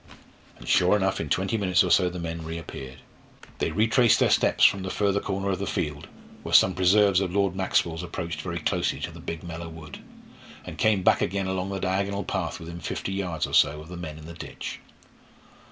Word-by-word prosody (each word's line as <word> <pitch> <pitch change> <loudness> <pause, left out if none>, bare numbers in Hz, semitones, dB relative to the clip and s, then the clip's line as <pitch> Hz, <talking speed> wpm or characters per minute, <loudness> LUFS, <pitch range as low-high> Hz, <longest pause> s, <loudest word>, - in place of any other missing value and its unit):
And - - -13
sure 90 +3 +4
enough 95 -1 0
in 75 - -5
twenty 95 +8 0
minutes 90 -3 +3
or - - -1
so 90 -2 +4
the 90 - -7
men 85 -1 -5
reappeared. 80 -5 -8 0.6
They - - 0
retraced 115 +6 +3
their - - +3
steps - - +4
from 100 - +4
the 95 - -4
further 100 +1 +1
corner 100 0 -2
of 95 - -2
the 100 - -3
field, 75 -2 -3 0.3
where - - -1
some 95 - +6
preserves 95 +1 +4
of 95 -3 -2
Lord 100 -1 +1
Maxwell's 85 -3 0
approached 85 -2 -5
very 85 0 -4
closely 80 - -1
to - - -4
the - - -12
big 80 - -6
Mellor 85 -1 -7
wood, 80 -2 -10 0.7
and - - -9
came 105 -4 +2
back - - +4
again 95 +1 -1
along 95 0 -2
the 100 -1 -3
diagonal 100 +2 -1
path - - -3
within 85 +1 -8
fifty 85 - -4
yards 90 -5 -2
or - - -9
so 75 +1 +4
of 80 +1 -11
the 90 - -7
men 80 -3 -7
in 80 - -11
the 85 - -9
ditch. 85 - -7
90 Hz, 210 wpm, -26 LUFS, 80-95 Hz, 0.7 s, some